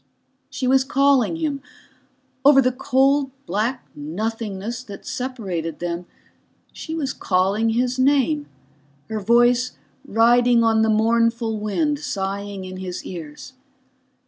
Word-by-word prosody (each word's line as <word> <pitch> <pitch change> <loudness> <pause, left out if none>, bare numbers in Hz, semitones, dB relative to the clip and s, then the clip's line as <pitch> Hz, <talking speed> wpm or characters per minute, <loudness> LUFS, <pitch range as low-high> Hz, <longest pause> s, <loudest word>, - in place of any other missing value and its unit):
She 260 - -4
was 265 +1 +4
calling 275 -1 +2
him. 305 -4 -2 0.8
Over 280 0 +7
the 255 -1 +3
cold 270 +2 +2 0.2
black 225 +7 -2
nothingness 215 +7 -4
that 200 -3 -10
separated 190 - -4
them 175 0 -4 0.7
she 320 - -6
was 280 -5 -2
calling 195 +4 +1
his 245 +3 0
name, 290 +2 +2 0.6
her 220 - -1
voice 240 +3 +3 0.3
riding 235 +1 +4
on 225 -1 +3
the 220 - +2
mournful 230 0 +1
wind 290 +8 -1
sighing 200 -5 -4
in 185 0 -7
his 185 -1 -6
ears. 165 - -8
230 Hz, 120 wpm, -22 LUFS, 200-260 Hz, 0.8 s, Over